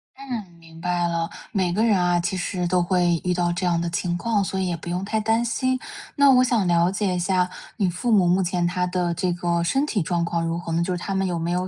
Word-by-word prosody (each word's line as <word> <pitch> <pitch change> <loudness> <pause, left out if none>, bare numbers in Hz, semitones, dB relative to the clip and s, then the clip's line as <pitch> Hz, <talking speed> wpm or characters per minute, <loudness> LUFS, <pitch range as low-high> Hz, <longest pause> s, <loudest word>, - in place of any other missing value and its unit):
嗯， 245 -8 -6
明 165 0 -15
白 175 0 0
了。 170 -1 -1 0.2
每 185 -4 0
个 215 - +1
人 215 -5 +3
啊 175 -1 +2
其 185 +2 -2
实 180 -1 -2
都 180 0 +2
会 175 -2 +2
遇 180 - +1
到 175 -1 0
这 180 +2 -2
样 170 -1 +1
的 170 - -2
情 175 +1 -1
况， 205 +3 0
所 190 0 -3
以 190 - 0
也 175 -1 -2
不 165 - -11
用 180 +2 -2
太 220 +2 -1
担 225 +2 +1
心。 255 +2 0 0.4
那 280 -1 +5
我 255 -1 +6
想 235 -6 +1
了 170 +1 +3
解 195 -2 -1
一 180 - -1
下， 180 0 +1 0.3
你 195 -5 +1
父 180 +8 -2
母 195 -5 +5
目 180 +2 +3
前 175 0 0
他 180 +1 0
的 180 -1 -1
这 180 +1 0
个 170 -1 0
身 270 - +1
体 215 - -1
状 170 +1 0
况 170 0 -1
如 165 0 -1
何 170 -1 -6
呢？ 170 +1 +1
就 180 0 -1
是 175 - -6
他 195 - -3
们 195 - +1
有 175 -2 -1
没 165 +1 -2
有 180 +1 -1
180 Hz, 295 characters per minute, -23 LUFS, 175-195 Hz, 0.4 s, 我